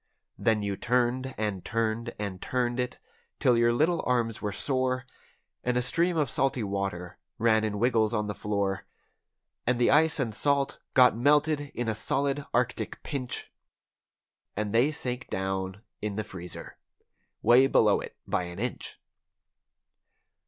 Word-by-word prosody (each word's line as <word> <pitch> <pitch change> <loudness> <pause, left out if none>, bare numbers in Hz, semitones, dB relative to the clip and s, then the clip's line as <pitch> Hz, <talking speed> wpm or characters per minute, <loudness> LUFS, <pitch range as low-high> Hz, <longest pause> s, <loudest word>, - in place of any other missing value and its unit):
Then 110 -2 +2
you 100 -1 -1
turned 125 +3 0
and 105 -4 -2
turned 115 +2 -1
and 100 -3 -5
turned 125 -1 -1
it, 125 0 -2 0.4
'til 125 - +4
your 120 0 +4
little 160 +7 +2
arms 120 -3 0
were 105 - -1
sore. 130 +3 0 0.6
And 125 0 +1
a 125 - +1
stream 170 +7 +1
of 150 -3 +2
salty 130 0 0
water 100 -3 -3 0.2
ran 110 -1 +3
in 105 -1 -1
wiggles 110 -1 +2
on 105 -2 0
the 105 - -3
floor. 100 -2 -2 0.8
And 125 0 +3
the 120 - +3
ice 155 +2 +4
and 120 -5 -1
salt 140 +4 0 0.2
got 125 -2 +7
melted 150 +4 +3
in 120 -1 -2
a 110 - +1
solid 140 +6 -1
Arctic 125 +1 -1
pinch, 130 -5 -4 1.1
And 105 0 -2
they 125 +6 +4
sank 130 -4 -5
down 95 +1 -3 0.2
in 105 -1 -3
the 110 - -1
freezer—way 110 +6 -1
below 105 -6 +4
it - - -9
by 90 - -1
an 85 0 -8
inch. 120 +4 -4
120 Hz, 145 wpm, -28 LUFS, 105-130 Hz, 1.1 s, got